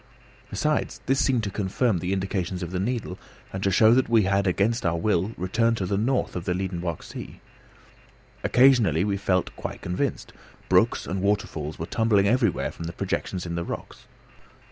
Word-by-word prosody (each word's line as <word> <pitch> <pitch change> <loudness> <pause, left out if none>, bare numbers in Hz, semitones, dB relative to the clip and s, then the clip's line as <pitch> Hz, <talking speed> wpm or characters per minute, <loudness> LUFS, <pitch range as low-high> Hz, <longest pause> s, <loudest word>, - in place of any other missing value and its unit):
Besides, 150 -1 -1
this 135 +1 +2
seemed 125 -4 +1
to 100 - -2
confirm 100 +1 0
the 90 +2 -3
indications 95 -2 -2
of 85 - -5
the 90 - -2
needle, 105 -3 -3 0.3
and 95 - -4
to 100 - +2
show 110 +4 +5
that 130 0 +2
we 115 -2 +5
had 100 +1 +1
against 105 +6 +1
our 85 -2 +1
will 95 +2 +1
returned 115 +6 +1
to 95 - -2
the 100 - -1
north 125 +6 0
of 90 -1 -4
the 90 - 0
Liedenbrock 90 -3 -3
sea. - - -9 1.0
Occasionally 120 - +4
we 100 -1 0
felt 95 -2 0
quite - - -6
convinced. 90 +1 -2 0.4
Brooks - - +3
and 95 +2 -3
waterfalls 95 -7 -1
were 80 - -4
tumbling 105 0 +2
everywhere 115 - +1
from 85 - -8
the 85 - -5
projections 95 -1 -3
in 85 - -4
the 85 0 -2
rocks. - - -7
95 Hz, 180 wpm, -25 LUFS, 90-110 Hz, 1.0 s, show